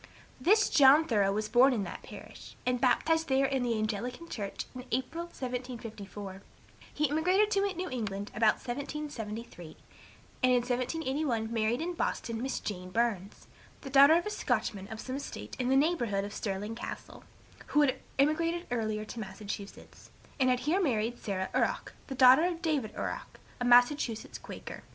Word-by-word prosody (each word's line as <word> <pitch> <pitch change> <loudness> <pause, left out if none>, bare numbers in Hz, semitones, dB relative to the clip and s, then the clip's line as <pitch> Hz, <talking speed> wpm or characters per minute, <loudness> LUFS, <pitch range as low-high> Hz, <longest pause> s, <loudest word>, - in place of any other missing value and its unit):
This 415 - +4
John 285 +3 +7
Thoreau 205 -7 +2
was 210 +1 -1
born 250 +4 +5
in 215 -5 -1
that - - -7
parish, - - -11
and 250 -1 0
baptized 320 +5 +2
there 270 0 +3
in 270 -1 0
the 235 -2 0
Anglican 225 +9 -3
church, 205 -10 -5
in 250 -1 -7
April, 260 +8 -2
1754; 230 - -6 0.5
he 300 +1 +1
emigrated 365 +8 +2
to 400 - +3 0.2
New 365 +2 -3
England 205 -5 -4
about 215 0 +4
1773, 240 - -6 0.6
and 255 - +4
in 250 - +5
1781 255 -2 -1
married 225 +3 +1
in 355 +1 -3
Boston 230 -8 -2
Miss 265 +1 -2
Jane 185 -3 -5
Burns, 205 -2 -1 0.4
the 270 - -8
daughter 280 +3 +8
of 345 - +1
a 420 - -3
Scotchman 195 - -1
of 220 +1 -8
some 260 +3 -4
estate 280 - -7
in 250 0 0
the 265 - +4
neighborhood 260 - +2
of 205 - -6
Stirling 205 +1 -3
Castle, 230 - -8 0.4
who 295 - +3
had 270 -3 +2 0.2
emigrated 330 +5 +1
earlier 215 -3 -1
to 230 - -8
Massachusetts, 200 0 -8 0.3
and 255 -1 +4
had 250 0 +2
here 320 +9 +1
married 240 - 0
Sarah 190 -2 -3
Orrok, - - 0
the 270 - -5
daughter 260 +5 +7
of 350 0 -2
David 285 -10 -1
Orrok, - - -5 0.2
a 245 - -1
Massachusetts 245 -1 +3
Quaker. - - -9
250 Hz, 165 wpm, -30 LUFS, 215-290 Hz, 0.6 s, daughter